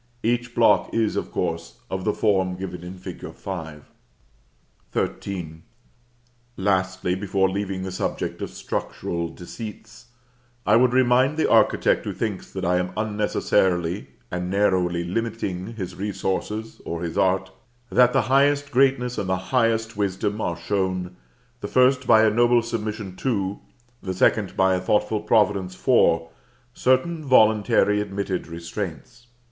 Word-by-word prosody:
Each 120 +1 -1
block 115 - +4
is, 115 -2 +1
of - - -2
course, 85 -1 -3
of 95 -1 -4
the 105 - +3
form 95 -4 +1
given 90 -2 -6
in 90 +1 -8
fig. 90 - -9
5. 80 -6 -7 1.1
XIII. 90 -5 -3 1.0
Lastly, 95 -2 0
before 95 0 +1
leaving 95 -1 -3
the 95 - -4
subject 95 - -3
of - - -3
structural 85 -1 -4
deceits, 110 +6 -10 0.6
I - - +5
would 125 +1 +5
remind 130 +3 +3
the 160 - +2
architect 110 -2 +3
who - - -3
thinks 105 -5 -4
that 95 -1 -4
I 90 +1 +2
am 90 0 -2
unnecessarily 100 -4 0 0.2
and 90 0 -3
narrowly 90 -3 +1
limiting 100 +1 -3
his 95 -5 -5
resources 105 +2 -3
or 85 0 -4
his 85 -1 -4
art, 95 0 +1 0.4
that 125 0 +5
the 135 - +3
highest 140 +4 +2
greatness 130 -2 +2
and 95 - -3
the 95 - +1 0.2
highest 115 -2 +2
wisdom 100 +1 -1
are 85 - -2
shown, 95 0 -2 0.4
the - - -5
first 130 0 +3
by 110 0 +6
a 110 - +4
noble 120 +1 +4
submission 105 -4 -4
to, 100 -6 -1 0.4
the 95 -1 -4
second 100 +1 +2
by 95 0 +4
a 90 - 0
thoughtful 105 +2 +1
providence 105 -4 +2
for, 85 -8 +3 0.4
certain 140 +7 +1
voluntarily 110 -5 +4
admitted 100 -2 -3
restraints. 90 +8 -7
100 Hz, 140 wpm, -24 LUFS, 95-115 Hz, 1.1 s, by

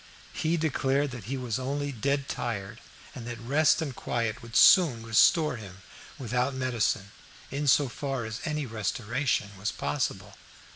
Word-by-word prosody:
He 165 +2 0
declared 140 -2 0
that 120 -5 -8
he 135 +5 -3
was 125 -3 -3
only 140 +2 -2
dead 140 +3 -1
tired, 105 -5 -4 0.3
and 120 -2 -8
that 120 -1 -5
rest 145 +7 +3
and 140 -5 -5
quiet 115 -2 -2
would 115 -1 -11
soon 145 - +6
restore 130 +5 +4
him 95 -3 -11 0.3
without 125 +1 -1
medicine, 115 -5 -1 0.4
in 145 +2 -2
so 140 +1 +5
far 135 -1 -4
as 110 0 -6
any 150 -2 -2
restoration 115 +1 -1
was 105 +3 -1
possible. 100 -9 -3
125 Hz, 150 wpm, -28 LUFS, 115-140 Hz, 0.4 s, soon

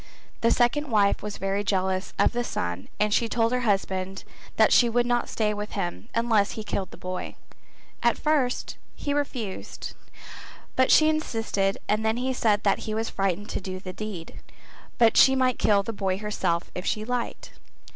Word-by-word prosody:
The 230 - +4
second 265 +5 +2
wife 205 -3 +3
was 210 -1 -5
very 195 +1 -1
jealous 190 -1 0
of - - +4
the 240 0 -1
son 90 - -3
and 210 0 +2
she 230 +1 +2
told 230 0 +1
her 250 - +1
husband 195 -4 -1 0.3
that - - +5
she 240 - +6
would 240 +1 +2
not 240 0 0
stay 215 -1 0
with 210 0 -5
him 195 +4 -4
unless 225 -3 +2
he 220 - -5
killed 195 -3 -3
the - - -12
boy; 185 0 -5 0.7
at - - +3
first 290 -5 0 0.2
he 285 - -2
refused 250 -9 -4 0.8
but 260 0 +3
she 310 - +6
insisted 225 -10 0
and 215 +1 +1
then 220 +1 +1
he 260 +1 -1
said 215 -4 +2
that 200 - +2
he 215 - -1
was 225 +1 -2
frightened 195 +1 -1
to - - -3
do 185 0 -5
the 185 -1 -7
deed, 195 -5 -7 0.6
but 230 -2 +4
she 265 0 +7
might 255 -2 +2
kill 200 -2 +3
the 230 - -4
boy 190 -2 -1
herself 200 -5 -2
if 180 - -5
she 215 +2 -1
liked. 245 0 -3
215 Hz, 185 wpm, -26 LUFS, 195-240 Hz, 0.8 s, she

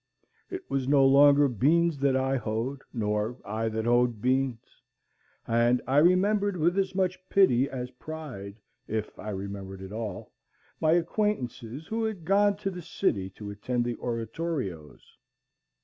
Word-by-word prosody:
It 370 0 -7
was 135 -2 -1
no 140 -1 +5
longer 140 +1 +6
beans 150 - +2
that 135 -1 +2
I 135 +1 +1
hoed, 120 +3 -3
nor 105 0 -1
I 110 +2 -2
that 110 0 -3
hoed 120 -1 +2
beans; 130 0 -1 0.7
and 120 +2 +3
I 135 - +1
remembered 195 +4 +3
with 175 +4 +2
as 195 -1 -1
much 185 -1 0
pity 140 -10 +4
as 125 -1 -5
pride, 125 -8 -8 0.3
if 110 0 -4
I 105 - -6
remembered 95 -1 -6
at 95 - -9
all, 110 -4 -5 0.5
my 155 0 +3
acquaintances 165 - -1
who 225 +5 -2
had 210 -7 -3
gone 200 +2 +4
to 200 -1 -3
the 180 -1 -7
city 110 - -1
to 100 +2 -8
attend 120 +4 -2
the 120 -1 -3
oratorios. 115 - -5
130 Hz, 150 wpm, -28 LUFS, 110-170 Hz, 0.7 s, longer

